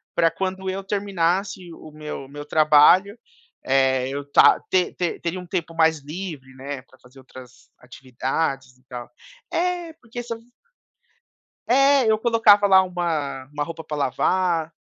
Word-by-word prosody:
pra 165 -1 +4
quando 190 +2 -4
eu 195 +1 -4
terminasse 190 -2 -2
o 155 - -13
meu 150 -2 -8
meu 145 +1 -9
trabalho, 155 +7 +4 0.5
eh, 130 -1 +2
eu 140 +1 -6
ta - - +6
te 185 -1 +1 0.3
teria 170 +2 -3
um 180 - -9
tempo 170 -2 -3
mais 160 -1 +2
livre, 150 -4 -8
né, 135 0 -7
pra 130 0 -24
fazer 125 +2 -18
outras 130 -1 -15
atividades 130 +1 -4
e 130 - -31
tal. 125 -2 -9 0.4
É, 350 -1 -2
porque 240 -4 -9
se 235 - -5 1.4
É, 275 -1 +4
eu 215 - +3
colocava 220 -3 +4
lá, 190 -1 +6
uma 165 -7 -3
uma 145 0 -3
roupa 165 -1 -8
pra 150 - -5
lavar, 165 +4 0
165 Hz, 145 wpm, -22 LUFS, 140-190 Hz, 1.4 s, ta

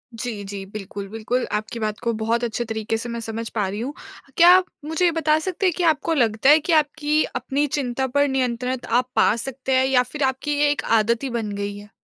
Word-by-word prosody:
जी, 225 -3 -5
जी। 195 0 -7
बिल्कुल, 200 0 -7
बिल्कुल 225 +4 -2
आपकी 215 +2 -3
बात 215 -1 -2
को 235 - +1
बहुत 230 +2 0
अच्छे 240 +1 -2
तरीके 220 0 -2
से 235 +2 -6
मैं 235 0 -4
समझ 225 0 -5
पा 205 -3 +1
रही 205 +3 -4
हूँ। 265 +5 -4 0.4
क्या 345 +1 +8
आप 370 - +1 0.2
मुझे 320 +3 0
ये 340 - +4
बता 310 -1 +2
सकते 375 +3 -3
हैं 360 - +3
कि 360 - 0
आपको 320 0 +2
लगता 235 -2 +2
है 305 - +8
कि 320 +2 -1
आपकी 305 0 +2
अपनी 285 +2 0
चिंता 265 -2 -2
पर 285 +3 +2
नियंत्रण 255 -1 -1
आप 245 +2 +2
पा 215 - +4
सकते 265 +2 -4
हैं 260 0 +4
या 255 -2 +3
फ़िर 275 +3 -5
आपकी 275 +3 -2
ये 295 0 +4
एक 290 - -2 0.2
आदत 235 +4 0
ही 270 - -2
बन 230 -3 -3
गई 200 0 -4
है? 205 0 -12
250 Hz, 235 wpm, -22 LUFS, 220-290 Hz, 0.4 s, क्या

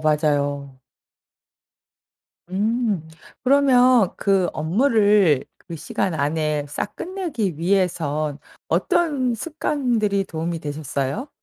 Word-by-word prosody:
맞아요. 145 -3 0 1.7
음. 210 -3 -1 0.3
그러면 255 -5 +4
그 195 -3 +2
업무를 200 - +3
그 170 - -10
시간 185 +3 -2
안에 150 0 -1
싹 145 - -4
끝내기 325 - -3
위해선 160 -5 0 0.3
어떤 275 -8 +1
습관들이 235 -8 -1
도움이 165 0 -4
되셨어요? 145 - -3
185 Hz, 190 characters per minute, -22 LUFS, 150-240 Hz, 1.7 s, 그러면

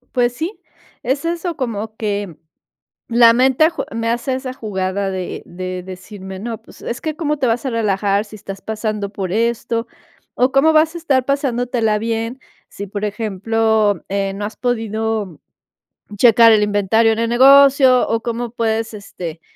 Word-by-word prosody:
Pues 245 -1 +2
sí, 325 - -5 0.4
es 270 +4 -1
eso, 340 0 -2
como 220 -6 -4
que 205 -6 -3 0.7
la 235 0 +6
mente 265 +5 +4
jue - - -5
me 230 0 -1
hace 240 +3 -1
esa 260 0 -5
jugada 195 -4 -3
de 185 -1 -5
de 185 +1 -6
decirme, 190 +1 -9
no, 225 +2 -5
pues, - - -17
es 235 - -5
que 310 -1 -3
cómo 300 -2 -1
te 265 - 0
vas 235 +3 0
a - - 0
relajar, 205 -2 0
si 215 - -12
estás 195 -1 -9
pasando 215 -2 -3
por 195 -3 -5
esto, 230 +2 -1 0.5
o 255 +1 +2
cómo 275 +4 +4
vas 315 +1 +4
a - - -6
estar 270 -6 +1
pasándotela 245 -5 0
bien, 230 +3 -3 0.3
si, 200 - -7
por 205 +2 -4
ejemplo, 215 -1 0
eh, 195 0 -1
no 205 +1 -4
has 215 - -6
podido 220 - -2 0.8
checar 230 0 +7
el 210 -1 +4
inventario 210 +2 +2
en 220 - -1
el 230 0 0
negocio, 265 0 +6
o 225 0 0
cómo 235 0 -3
puedes, 225 -1 -1
este, 175 -5 -8
225 Hz, 165 wpm, -18 LUFS, 205-250 Hz, 0.8 s, checar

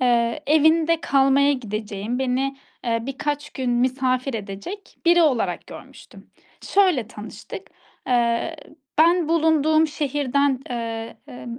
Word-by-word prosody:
eee, 240 +2 +1
evinde 315 +2 +4
kalmaya 275 0 +3
gideceğim, 215 -2 -4
beni, 265 +1 -1 0.3
eee, 230 -1 +1
birkaç 290 +2 -3
gün 260 -3 -3
misafir 255 +1 0
edecek 215 - -7
biri 345 0 +6
olarak 230 - 0
görmüştüm. - - -13 0.3
Şöyle 360 - +2
tanıştık: 215 -2 -9 0.4
Eee, 240 +6 +1 0.4
ben 335 0 +4
bulunduğum 315 -1 +3
şehirden, 285 -3 0
eee, 230 -1 -4
emm 240 -1 -8
265 Hz, 110 wpm, -23 LUFS, 235-310 Hz, 0.4 s, biri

